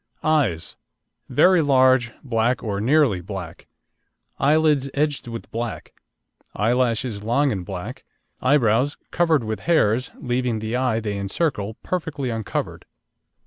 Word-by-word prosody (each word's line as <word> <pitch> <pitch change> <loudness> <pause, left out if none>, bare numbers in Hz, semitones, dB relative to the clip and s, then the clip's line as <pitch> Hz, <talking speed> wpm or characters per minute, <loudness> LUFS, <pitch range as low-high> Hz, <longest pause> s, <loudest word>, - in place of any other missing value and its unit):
EYES 125 - 0 0.5
Very 185 -2 +5
large, 130 -4 +4
black, 120 -1 0
or 100 -3 -2
nearly 130 - +3
black; 90 -2 -8 0.7
eyelids 150 -1 +3
edged 145 -3 -1
with 115 -1 -7
black, 115 0 -5 0.6
eyelashes 115 -1 0
long 135 +6 +2
and 95 -4 -3
black, 90 -1 -7 0.4
eyebrows 130 0 +2
covered 160 -6 +2
with 110 0 -3
hairs, 125 -7 +2
leaving 125 -2 -1
the 110 +2 -3
eye 125 -3 +1
they 105 -2 -3
encircle 105 - -2
perfectly 155 -8 -3
uncovered. 110 -3 -4
120 Hz, 115 wpm, -22 LUFS, 110-145 Hz, 0.7 s, Very